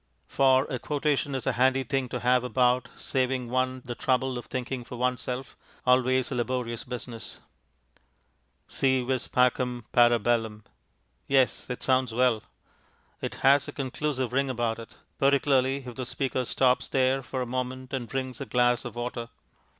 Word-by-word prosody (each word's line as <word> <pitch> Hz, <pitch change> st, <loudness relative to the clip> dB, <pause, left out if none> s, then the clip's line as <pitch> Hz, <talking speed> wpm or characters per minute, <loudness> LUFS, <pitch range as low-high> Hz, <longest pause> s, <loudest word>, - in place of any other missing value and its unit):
For 130 Hz, 0 st, +4 dB
a 130 Hz, -4 st, -4 dB
quotation 145 Hz, -1 st, 0 dB
is 130 Hz, -, -4 dB
a 135 Hz, -, +2 dB
handy 130 Hz, +2 st, +2 dB
thing 130 Hz, 0 st, -1 dB
to -, -, -4 dB
have 125 Hz, 0 st, +3 dB
about, 125 Hz, 0 st, +2 dB
saving 130 Hz, -2 st, -1 dB
one 130 Hz, 0 st, 0 dB
the 120 Hz, -, -4 dB
trouble 130 Hz, +1 st, 0 dB
of -, -, -10 dB
thinking 125 Hz, 0 st, -4 dB
for 125 Hz, -, -9 dB
oneself, 125 Hz, +1 st, -2 dB, 0.3 s
always 130 Hz, 0 st, +3 dB
a -, -, -2 dB
laborious 120 Hz, -1 st, -2 dB
business. 120 Hz, -2 st, -7 dB, 1.3 s
Si 130 Hz, -1 st, +1 dB
vis 130 Hz, 0 st, -1 dB
pacem, 125 Hz, -1 st, +1 dB
para 120 Hz, 0 st, +5 dB
bellum. 110 Hz, -1 st, -1 dB, 0.6 s
Yes, 135 Hz, -2 st, +2 dB
it 125 Hz, -, -5 dB
sounds 130 Hz, -3 st, +1 dB
well. 125 Hz, -3 st, +3 dB, 0.8 s
It -, -, -4 dB
has 140 Hz, +1 st, +5 dB
a -, -, -5 dB
conclusive 130 Hz, -1 st, -2 dB
ring 135 Hz, +1 st, +1 dB
about 120 Hz, -2 st, -1 dB
it, 115 Hz, -, -11 dB, 0.2 s
particularly 135 Hz, -1 st, +3 dB
if 125 Hz, -, -7 dB
the 130 Hz, +1 st, -5 dB
speaker 130 Hz, -2 st, -1 dB
stops 130 Hz, +1 st, +2 dB
there 130 Hz, 0 st, +2 dB
for 130 Hz, +1 st, -3 dB
a -, -, -4 dB
moment 130 Hz, +1 st, -4 dB
and 125 Hz, -3 st, -3 dB
drinks 130 Hz, -1 st, -4 dB
a 135 Hz, -, -5 dB
glass 120 Hz, +1 st, +2 dB
of 120 Hz, -, -6 dB
water. 120 Hz, -1 st, -4 dB
125 Hz, 160 wpm, -27 LUFS, 120-130 Hz, 1.3 s, para